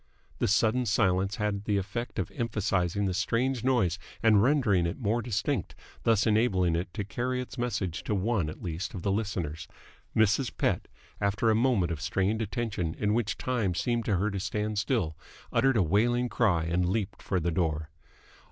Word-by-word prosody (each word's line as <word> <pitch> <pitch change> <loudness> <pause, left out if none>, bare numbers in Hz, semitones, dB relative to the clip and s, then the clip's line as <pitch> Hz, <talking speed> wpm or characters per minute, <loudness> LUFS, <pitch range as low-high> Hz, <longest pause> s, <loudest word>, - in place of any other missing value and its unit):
The - - +2
sudden 115 +4 +2
silence 95 -1 +2
had 105 -3 -2
the 105 -2 +1
effect 105 +5 -4
of - - -2
emphasising 100 -5 0
the 95 - 0
strange 120 +6 0
noise 110 -9 +2 0.2
and 110 -3 +6
rendering 110 - +3
it 85 - -4
more 115 -1 0
distinct, 115 - -2 0.3
thus 110 -2 +4
enabling 100 -6 +2
it 90 +2 -2
to 105 - -2
carry 125 +5 -2
its 125 - -6
message 100 -8 -2
to 105 - 0
one 100 -4 0
at 75 - -9
least 90 +5 -4
of 90 - -6
the 100 - +1
listeners. 90 -7 -2 0.5
Mrs. 110 +4 +2
Pett, - - 0 0.3
after 100 +3 +2
a - - +3
moment 110 -8 +2
of 80 -3 -4
strained 95 +7 0
attention 100 -6 -2
in 105 0 0
which 110 -2 0
time 115 -8 -1
seemed 120 +5 0
to 105 - +1
her 105 +4 0
to 100 - -3
stand 105 +2 -2
still, 105 - 0 0.4
uttered 135 -2 +3
a 100 - +4
wailing 120 +8 +2
cry 95 -11 +2
and 90 +2 0
leaped 100 0 -2
for 95 - -1
the 85 +1 -1
door. 80 -3 -1
105 Hz, 180 wpm, -29 LUFS, 90-115 Hz, 0.5 s, and